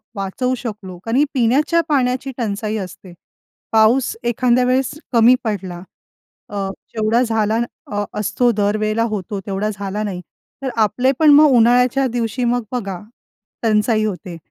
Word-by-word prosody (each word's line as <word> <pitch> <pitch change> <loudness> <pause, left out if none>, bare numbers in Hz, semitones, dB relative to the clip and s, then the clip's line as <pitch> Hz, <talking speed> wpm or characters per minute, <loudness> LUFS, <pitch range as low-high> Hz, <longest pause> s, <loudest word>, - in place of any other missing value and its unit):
वाचवू 205 +6 -2
शकलो, 210 -6 -7
कारण 225 +1 -1
ही 285 - +5
पिण्याच्या 275 +7 +2
पाण्याची 260 -1 0
टंचाई 215 -2 -2
असते. 180 0 -12 0.6
पाऊस 225 +4 +3
एखाद्या 240 +1 +2
वेळेस 255 +1 +1 0.2
कमी 235 +2 +6
पडला 190 -6 -4 0.7
अ, 200 -2 -3 0.3
जेवढा 220 +2 +2
झाला 225 -2 0 0.6
असतो 210 +4 +1
अ, - - +4
दर 205 0 +1
वेळेला 215 +1 0
होतो, 200 -1 -4
तेवढा 200 +1 -2
झाला 200 +1 -4
नाही, 195 -4 -4 0.4
तर 265 - -2 0.2
आपले 255 +6 +1
पण 310 -2 +6
मग 300 0 +7
उन्हाळ्याच्या 250 +3 +4
दिवशी 240 +1 -2
मग 245 - -1
बघा 200 -7 -3 0.6
टंचाई 215 0 +2
होते. 180 -4 -4
225 Hz, 140 wpm, -19 LUFS, 205-250 Hz, 0.7 s, मग